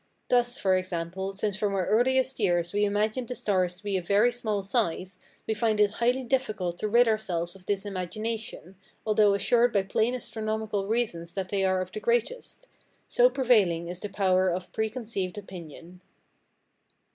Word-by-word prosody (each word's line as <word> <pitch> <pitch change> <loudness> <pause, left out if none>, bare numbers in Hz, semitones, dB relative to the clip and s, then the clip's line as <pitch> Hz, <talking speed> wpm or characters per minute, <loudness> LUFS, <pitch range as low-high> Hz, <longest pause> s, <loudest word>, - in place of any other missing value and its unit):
Thus, 245 0 +2
for 190 -8 +2
example, 185 +1 -3
since 200 0 -2
from 205 -2 0
our 185 -2 0
earliest 260 +3 +2
years 175 -4 +1
we 205 0 +2
imagined 215 +4 0
the 250 - -4
stars 185 -5 0
to 195 - -16
be 200 -2 0
of 180 - -6
very 210 +5 +4
small 220 -5 -2
size, 190 -3 -1 0.3
we 220 - 0
find 215 0 0
it 205 -1 +4
highly 245 +4 +1
difficult 215 -9 -1
to 215 - -1
rid 235 +3 +5
ourselves 180 -6 -1
of 190 -1 -17
this 205 0 -1
imagination, 205 0 -5 0.3
although 210 -2 +4
assured 235 +4 +3
by 200 -3 +2
plain 220 +5 0
astronomical 220 -3 -2
reasons 210 -7 -2
that 190 -2 -3
they 195 -1 0
are 185 -1 +2
of 185 0 -6
the 215 - -5
greatest, 240 - -1 0.4
so - - +4
prevailing 205 - +2
is 175 0 -6
the 205 - -5
power 185 -2 +2
of 180 +1 -4
preconceived 220 -4 -3
opinion. 180 -2 -10
205 Hz, 170 wpm, -27 LUFS, 185-225 Hz, 0.4 s, rid